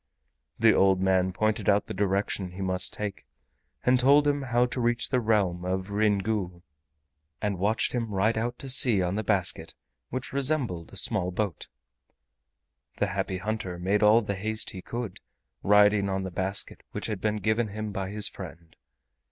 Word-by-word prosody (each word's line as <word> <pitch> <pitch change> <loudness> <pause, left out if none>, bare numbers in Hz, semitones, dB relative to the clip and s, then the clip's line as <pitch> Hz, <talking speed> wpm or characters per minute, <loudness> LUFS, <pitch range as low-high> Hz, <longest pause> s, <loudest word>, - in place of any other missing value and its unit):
The - - +5
old 95 -1 +3
man 95 -1 +1
pointed 110 +4 0
out 100 0 +3
the - - -6
direction 95 -1 -2
he 95 - -8
must 95 0 0
take, 100 -9 -6 0.6
and 125 0 +3
told 140 +3 +4
him 145 0 +1
how 125 -2 +1
to 125 +1 -4
reach 120 0 0
the 130 - +1
realm 100 -6 0
of 95 +2 -3
Ryn 105 0 +2
Gu, 95 -4 -3 0.8
and 100 -3 -2
watched 105 +4 0
him 115 -3 -3
ride 105 +4 +1
out 120 +2 -2
to 135 - -8
sea 120 -7 +7
on 90 +1 -1
the 110 +2 -2
basket, 95 -5 +1 0.3
which 130 +1 -5
resembled 135 - -1
a - - -8
small 90 - +3
boat. 95 -1 -3 1.3
The 105 - 0
Happy 95 -1 -2
Hunter 95 -2 -4
made 95 +4 0
all 110 +2 +5
the 100 - -3
haste 110 +3 -1
he 95 - -8
could, 115 -2 -6 0.4
riding 105 0 +4
on 95 0 -2
the 95 - -5
basket 95 +3 -1
which - - -5
had 105 -4 -4
been 105 0 0
given 110 +2 0
him 105 +1 -5
by 95 -1 -4
his 105 0 -1
friend. 85 -3 -10
105 Hz, 175 wpm, -27 LUFS, 95-110 Hz, 1.3 s, sea